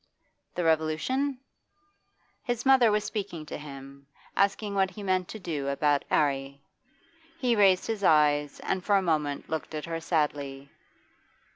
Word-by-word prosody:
The 175 - -1
Revolution?... 165 - 0 1.1
His 245 0 -3
mother 260 -4 +6
was 210 0 +1
speaking 195 -8 -5
to - - -6
him, 140 -1 -11 0.3
asking 200 +1 +1
what 190 -1 +2
he 205 +1 -9
meant 185 -2 0
to - - -7
do 155 -8 -4
about 145 +1 +1
'Arry. 140 -1 0 0.8
He 250 -6 +1
raised 195 -3 +4
his 220 -3 -3
eyes, 150 -3 +3
and 190 -1 -2
for 205 - +2
a 195 - +4
moment 150 -4 -1
looked 160 0 -4
at 150 - -4
her 165 -1 -4
sadly. 145 -4 -2
165 Hz, 145 wpm, -28 LUFS, 145-200 Hz, 1.1 s, mother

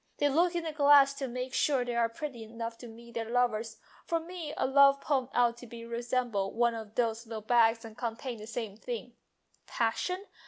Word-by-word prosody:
They 290 - +2
look 340 +5 +2
in 340 - -1
the 320 - -3
glass 285 -2 +6
to 270 - -2
make 250 +1 -5
sure 275 -4 +2
that - - -2
they 240 -1 -3
are 230 -1 +2
pretty 245 -1 -6
enough 230 +1 -6
to 245 - -9
meet 235 +1 -13
their 225 -1 -4
lovers. 235 -2 0 0.3
For 335 - +1
me 335 -2 -7
a - - +1
love 275 +1 +6
poem 270 -3 0
ought 240 -1 +2
to 245 - -11 0.2
resemble 235 -4 -1
one 235 0 +2
of 220 -2 -8
those 230 -1 0
little 220 -1 -5
bags 225 0 +3
and 220 -1 -10
contain 235 0 -4
the 215 - -9
same 225 -3 -5
things. 475 - -6 0.5
Passion? 360 - -1
240 Hz, 205 wpm, -30 LUFS, 230-280 Hz, 0.5 s, glass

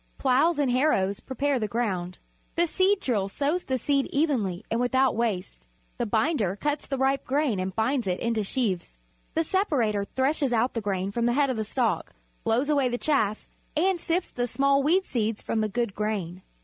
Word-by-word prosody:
Ploughs 280 +5 +3
and 280 -4 +2
harrows 215 -7 +2
prepare 270 +1 -1
the 215 - -1
ground. 190 -6 -2 0.4
The 345 - +3
seed 380 +4 +2
drill 205 - 0
sows 295 - -1
the 260 - 0
seed 275 +2 +1
evenly 250 - 0
and 230 - +1
without 260 +1 +2
waste. 185 - -2 0.3
The 240 - 0
binder 220 - +1
cuts 295 +6 -2
the 275 - -2
ripe 270 +1 +1
grain 270 -6 0
and 185 0 -3
binds 235 0 0
it 180 -1 0
into 230 -2 0
sheaves. 195 - -2 0.4
The 325 - +2
separator 255 - +1
threshes 270 +2 0
out 235 +2 +2
the 230 - -2
grain 195 -1 -2
from 235 +3 0
the 240 - +2
head 280 0 +2
of 250 - -3
the 220 - 0
stalk, 220 -5 -1 0.3
blows 245 +5 +1
away 280 -4 +3
the 245 - -1
chaff, 220 -8 0 0.3
and 365 +2 +2
sifts 345 +2 -1
the 245 0 -2
small 275 +2 +2
weed 355 +7 +3
seeds 220 -3 -2
from 220 - -1
the 215 - 0
good 235 -1 -1
grain. 195 -4 -3
245 Hz, 190 wpm, -26 LUFS, 210-280 Hz, 0.4 s, Ploughs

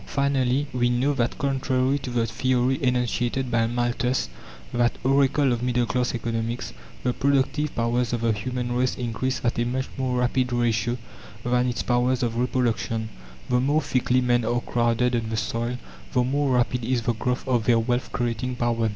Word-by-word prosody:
Finally, 140 -1 +1
we 120 -1 +2
know 125 +4 +2
that 120 -3 -1
contrary 135 0 +1
to 130 - -6
the 120 -2 +1
theory 130 +2 +1
enunciated 125 0 0
by 115 -1 +2
Malthus 120 +1 0 0.4
that 120 0 +1
Oracle 135 0 +3
of 120 - -2
middle 125 -1 +1
class 125 +2 0
Economics 115 +1 -3 0.3
the 125 - +1
productive 140 +3 +1
powers 120 0 0
of 120 -2 -1
the 115 -1 +2
human 125 +3 -3
race 125 +1 +1
increase 125 +2 -2
at 120 0 +1
a - - +3
much 130 +2 -2
more 130 -1 0
rapid 125 0 +1
ratio 120 0 +1 0.5
than 125 0 +2
its 120 - -2
powers 125 +1 +1
of 115 -1 -1
reproduction. 115 -2 0 0.4
The 125 - +2
more 145 +4 +2
thickly 130 0 +1
men 120 -1 +2
are 120 +2 0
crowded 120 +1 +1
on 115 -1 -1
the 110 - -2
soil, 120 +3 -2 0.4
the 125 - +3
more 135 +1 +1
rapid 125 0 +1
is 120 0 0
the 120 - +1
growth 125 +3 -2
of 120 -4 +1
their 120 -2 +4
wealth 120 +2 -1
creating 120 +1 -2
power. 115 -2 +1
125 Hz, 175 wpm, -25 LUFS, 120-130 Hz, 0.5 s, their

